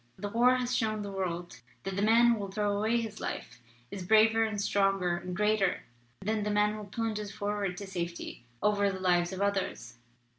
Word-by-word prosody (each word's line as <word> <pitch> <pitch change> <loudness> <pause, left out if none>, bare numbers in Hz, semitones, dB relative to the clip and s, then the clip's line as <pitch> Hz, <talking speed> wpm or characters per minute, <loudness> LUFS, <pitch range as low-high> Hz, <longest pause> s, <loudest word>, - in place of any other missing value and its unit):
The 205 - -4
war 245 +4 +4
has 250 -1 -1
shown 215 -2 0
the 200 - -5
world 175 -7 -4 0.2
that 195 -1 -4
the 200 - -1
man 230 +3 +5
who 230 - +1
will 200 -1 -4
throw 205 0 0
away 220 +3 +1
his 220 -2 -5
life 120 +1 -5 0.3
is 195 - -5
braver 220 +4 +5
and 215 -2 -2
stronger 195 -3 +1
and 180 +1 -6
greater 210 -2 +1 0.4
than 215 +2 -1
the 210 - -1
man 210 0 +2
who 215 -1 -6
plunges 215 -1 -3
forward 205 -3 -2
to 200 - -6
safety 175 -8 -5 0.2
over 205 -1 +3
the 190 - -5
lives 175 -1 +2
of 190 0 -5
others. 190 -12 -2
205 Hz, 195 wpm, -30 LUFS, 190-215 Hz, 0.4 s, man